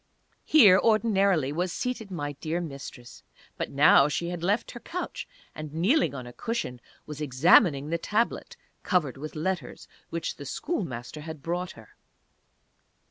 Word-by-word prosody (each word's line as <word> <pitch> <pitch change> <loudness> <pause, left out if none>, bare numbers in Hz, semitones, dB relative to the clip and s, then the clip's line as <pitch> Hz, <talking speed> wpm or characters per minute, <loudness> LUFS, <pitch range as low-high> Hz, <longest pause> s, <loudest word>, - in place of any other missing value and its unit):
Here 210 -12 +7
ordinarily 200 - +2
was 175 +3 -1
seated 245 -2 -3
my 145 -6 -4
dear 160 +2 -2
Mistress. 140 -6 -8 0.3
But - - -3
now 140 0 +6
she 170 +3 -2
had 175 -1 -5
left 200 +6 0
her 240 - -9
couch, 360 +8 -5 0.3
and, 155 -1 -8
kneeling 175 - +2
on 130 -2 -6
a 120 - -10
cushion, 175 - -4 0.2
was 150 0 -8
examining 150 - +4
the 170 - 0
Tablet 220 +7 -1 0.2
covered 170 -9 0
with 150 +2 -7
letters 175 +3 -3 0.2
which 165 0 -4
the 145 - -8
Schoolmaster 150 - -4
had 155 -2 -8
brought 175 +2 -3
her. 110 -2 -15
165 Hz, 145 wpm, -27 LUFS, 145-195 Hz, 0.3 s, Here